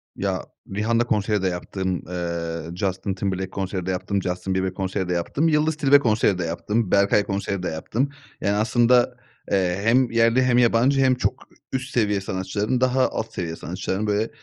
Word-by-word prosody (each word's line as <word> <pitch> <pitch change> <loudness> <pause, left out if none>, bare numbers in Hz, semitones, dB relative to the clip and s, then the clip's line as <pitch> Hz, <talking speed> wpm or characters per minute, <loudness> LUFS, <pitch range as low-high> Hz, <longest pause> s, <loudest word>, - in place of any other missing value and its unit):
Ya, - - -2 0.3
Rihanna 115 +3 +2
konseri 105 -3 0
de 95 - +1
yaptım, 90 0 -3
eee, 85 -2 -3
Justin 95 +1 -2
Timberlake 95 -1 -2
konseri 95 -2 -3
de 95 - -1
yaptım, 95 +2 -1
Justin 90 +1 -2
Bieber 95 0 0
konseri 95 -1 -3
de - - +1
yaptım, 110 - 0
Yıldız 155 0 +2
Tilbe 145 -2 +5
konseri 110 -6 +2
de 90 - -2
yaptım, 100 +5 -1
Berkay 100 +1 +4
konseri 100 -1 -3
de - - -1
yaptım. 115 - -2 0.3
Yani, 100 +1 +1
aslında, 120 +3 +3 0.3
eee, 95 -1 +1
hem 120 +2 +3
yerli 115 +2 +3
hem 125 -1 +3
yabancı 125 +3 +4
hem 130 -1 +4
çok 125 - 0 0.4
üst 130 0 -3
seviye 105 -4 +1
sanatçıların, 95 +6 -2
daha 130 0 +3
alt 110 0 -4
seviye 85 -5 -3
sanatçıların, 95 +4 -3
böyle, 105 +2 0
100 Hz, 175 wpm, -23 LUFS, 95-120 Hz, 0.4 s, Tilbe